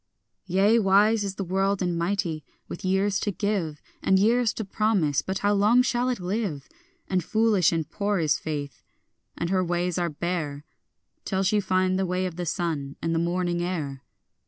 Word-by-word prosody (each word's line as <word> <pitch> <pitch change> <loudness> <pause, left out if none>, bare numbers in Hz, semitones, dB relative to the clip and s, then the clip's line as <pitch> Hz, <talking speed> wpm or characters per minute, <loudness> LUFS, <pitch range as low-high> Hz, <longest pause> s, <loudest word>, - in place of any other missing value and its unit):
Yea, 200 +5 +4
wise 205 +2 +4
is 195 -1 -4
the 195 - -3
world 195 +2 0
and 175 -2 -1
mighty, 170 -3 -1 0.2
with - - -8
years 190 +1 +1
to - - -1
give, 195 -7 -2 0.2
And 190 - +3
years 230 +3 +3
to 220 - -4
promise; 190 -9 +1
but 190 0 -3
how 205 - +4
long 205 +3 +3
now - - +7
shall 250 0 0
it 250 - -1
live? 180 -6 -3 0.4
And 185 -2 0
foolish 215 -3 +3
and 165 -3 -1
poor 200 +5 -1
is 155 -5 +1
faith, 145 -4 -5 0.6
and 170 +1 -2
her 185 -1 +2
ways 175 0 -1
are 175 -1 0
bare, 155 -2 -3 0.6
Till 190 -1 -1
she 210 +2 +2
find 185 -1 +1
the 190 - 0
way 180 +1 -1
of 180 -3 -4
the 175 0 -4
sun, 155 -5 -2
and 165 0 -1
the 165 - +1
morning 175 0 0
air. 155 -7 -3
185 Hz, 185 wpm, -26 LUFS, 170-200 Hz, 0.6 s, now